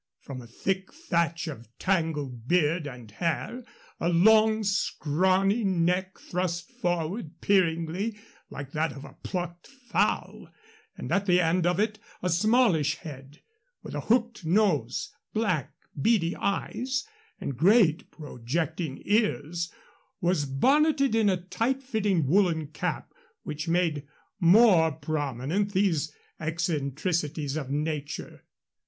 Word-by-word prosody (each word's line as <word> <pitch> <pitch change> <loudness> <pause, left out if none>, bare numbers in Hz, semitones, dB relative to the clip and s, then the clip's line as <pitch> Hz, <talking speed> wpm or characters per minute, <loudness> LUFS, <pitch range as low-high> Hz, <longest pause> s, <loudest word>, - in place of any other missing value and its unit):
From 130 -2 -8
a 120 - -12
thick 190 +10 -2
thatch 170 - -1
of 120 -7 -7
tangled 150 -10 -1
beard 165 -1 +2
and 125 -5 -10
hair, 170 - -2 0.4
a 170 - +1
long, 220 +5 +5
scrawny 190 +2 +1
neck 185 0 +1
thrust 175 -1 -3
forward 175 0 -3
peeringly, 185 +2 +1 0.3
like 140 -1 -7
that 155 +2 -1
of 140 - -9
a - - -13
plucked 175 -2 -5
fowl; 255 -3 -2 0.5
and - - -6
at 200 +1 +1
the 180 -1 +5
end 175 +1 +2
of 175 +1 +1
it 215 0 0 0.2
a 180 - +1
smallish 180 - +3
head, 140 -3 -11 0.4
with - - -8
a - - -2
hooked 235 -2 +1
nose, 160 - +1 0.2
black, 180 - 0 0.3
beady 185 -3 +2
eyes, 255 +6 -2 0.3
and 140 - -4
great, 185 - +4
projecting 145 +1 -4
ears 175 -5 0 0.5
was 175 -5 +1
bonneted 275 - +3
in 220 -2 +3
a 185 - +2
tight 230 +9 -2
fitting 210 - +1
woolen 165 0 +2
cap 150 +1 -4 0.3
which 155 +2 -5
made 165 -4 0 0.3
more 180 -3 +6
prominent 155 - -2
these 170 -6 +1 0.3
eccentricities 155 -1 -1
of 145 -4 -4
nature. 145 0 -4
170 Hz, 120 wpm, -27 LUFS, 150-200 Hz, 0.5 s, more